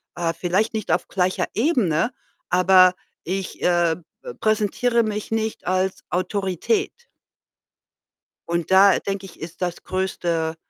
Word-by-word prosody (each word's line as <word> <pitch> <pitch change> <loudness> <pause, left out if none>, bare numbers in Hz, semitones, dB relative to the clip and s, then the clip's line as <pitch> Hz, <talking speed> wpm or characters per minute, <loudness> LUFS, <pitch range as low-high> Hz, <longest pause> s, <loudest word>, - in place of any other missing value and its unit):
äh 170 -1 -1
vielleicht 185 +7 0
nicht 220 -1 -3
auf - - +1
gleicher 185 -1 0
Ebene, 225 - +1 0.4
aber 185 0 +5 0.3
ich, 190 +2 -4
äh, 175 -2 +3 0.3
be 485 -1 -8
präsentiere 220 +2 +1
mich 215 -1 -4
nicht 220 0 -2
als 185 +1 0
Autorität. 195 - -1 1.5
Und 170 +1 -2
da, 195 +1 +6
denke 195 -1 -4
ich, 190 - -14
ist 165 +3 -9
das 175 -1 -3
größte, 170 -3 -2
190 Hz, 125 wpm, -22 LUFS, 175-215 Hz, 1.5 s, da